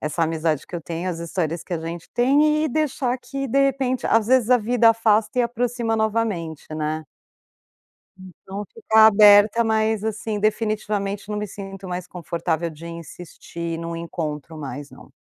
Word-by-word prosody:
essa 155 +2 -2
amizade 160 -2 0
que 175 - -6
eu 170 - -7
tenho, 170 +3 -4
as 175 -2 -3
histórias 170 -1 -3
que 180 - -8
a 170 - 0
gente 165 +1 -6
tem 300 +5 +3
e - - 0
deixar 265 -3 0
que, 275 +2 -5
de 275 - +1
repente 265 -2 0
às 225 -2 +3
vezes 255 -1 +3
a 250 - +6
vida 230 +1 +4
afasta 225 +1 +2
e - - +5
aproxima 235 -1 -1
novamente, 215 -8 -1
né? 155 0 -3 1.1
Então, 190 +2 -9
ficar 220 - +5
aberta, 210 +1 +6
mas, 220 -1 +1
assim, 220 0 -3
definitivamente 210 -1 -1
não 210 - -3
me 210 - -2
sinto 195 -1 -8
mais 180 0 -4
confortável 170 -1 -3
de 160 +2 -11
insistir 170 0 -7
num 170 0 -5
encontro 160 -2 -5
mais 145 -1 -7
não. - - -15
205 Hz, 165 wpm, -22 LUFS, 170-230 Hz, 1.1 s, a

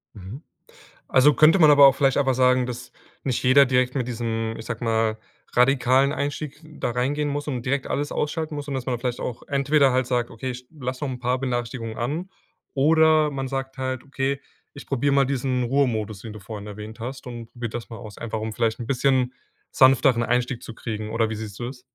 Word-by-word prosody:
Mhm, 105 +7 -9 0.7
also, 140 +3 +5
könnte 155 +5 +6
man 155 -3 +7
aber 140 -1 +9
auch 135 - +4
vielleicht 135 -2 +2
einfach 135 -2 +2
sagen, 125 0 +3
dass 125 0 -7 0.3
nicht 130 -3 -1
jeder 135 +2 +6
direkt 125 0 +1
mit 125 -3 -1
diesem, 115 -2 -2
ich 110 - -9
sage 115 0 -5
mal, 110 -1 +1 0.4
radikalen 130 +1 +4
Einstieg 145 0 -4
da 155 -5 -4
reingehen 140 +5 -1
muss 145 +1 -3
und 125 -4 -3
direkt 135 +1 -1
alles 145 +1 -2
ausschalten 155 +1 -2
muss 145 0 -6
und 140 - -4
dass 130 -2 -3
man 125 - -1
da - - -8
vielleicht 125 -1 -3
auch 120 -1 -5
entweder 140 0 +3
halt 130 0 +2
sagt: 120 -1 -1
„Okay, 130 +3 -5
ich 125 0 -10
lasse 130 -3 -5
noch - - -2
'n 125 - -6
paar 125 +1 0
Benachrichtigungen 120 -3 -3
an", 155 +10 -3 0.4
oder 155 +1 +4
man 135 -1 -3
sagt 135 0 -4
halt: 130 -1 -3
„Okay, 140 0 -2 0.3
ich - - -11
probiere 140 +1 0
mal 140 -1 +4
diesen 130 -1 -1
Ruhemodus“, 115 -5 0
den 110 0 -8
du 105 - -9
vorhin 105 +1 -8
erwähnt 105 +2 -9
hast 130 +4 -6
und 120 -2 -8
probiert 120 -2 -6
das 120 -1 -6
mal 115 - -8
aus, 105 -2 -10
einfach, 110 -1 -4
um 110 0 -4
vielleicht 115 0 0
'n 120 - -6
bisschen 130 -1 +1 0.4
sanfteren 130 -2 +5
Einstieg 125 0 0
zu 115 - -9
kriegen, 110 -1 -5
oder 115 -1 +1
wie 110 - -3
siehst 105 -2 -7
du 120 - -3
das? 125 0 -9
125 Hz, 215 wpm, -24 LUFS, 115-140 Hz, 0.7 s, aber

